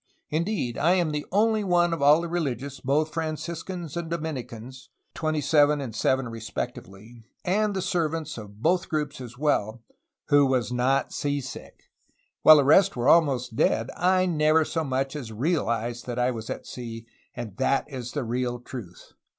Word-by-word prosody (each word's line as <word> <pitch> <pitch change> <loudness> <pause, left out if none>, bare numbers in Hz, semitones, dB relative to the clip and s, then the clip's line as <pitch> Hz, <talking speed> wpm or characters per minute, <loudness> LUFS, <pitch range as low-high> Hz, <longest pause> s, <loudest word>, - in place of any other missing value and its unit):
Indeed 160 - -1
I 165 +5 +4
am 175 -4 +1
the 150 -1 -3
only 215 +2 +2
one 175 -2 +2
of 165 - -3
all 145 +3 +6
the 170 - -3
religious, 140 -5 -3
both 150 +4 0
Franciscans 165 +1 -4
and 170 -1 -4
Domini 160 -5 -3
cans,2 130 +6 -10 2.2
and 205 +3 +1
the 190 - -1
servants 165 -4 -2
of 105 0 -12
both 175 +2 +2
groups 150 -4 -2
as 120 -1 -9
well, 120 -6 0 0.5
who 145 -1 +5
was 125 -2 0
not 130 +2 +1
sea 145 0 -1
sick; 130 -1 -9 0.6
while 155 0 +9
the 145 - +4
rest 190 +8 +5
were 125 +2 +1
almost 135 -8 +3
dead, 110 - +1
I 185 +1 +3
never 155 -2 +3
so 160 +1 -2
much 135 0 -2
as 125 -7 -6
realized 120 -3 -1
that 120 -1 -4
I 125 +1 +2
was 115 -2 -7
at - - -5
sea, 115 -2 -7 0.3
and 115 -5 -6
that 135 - +1
is 125 -4 -7
the 145 - -2
real 120 +1 -2
truth." 115 -8 -10
145 Hz, 160 wpm, -26 LUFS, 125-165 Hz, 2.2 s, while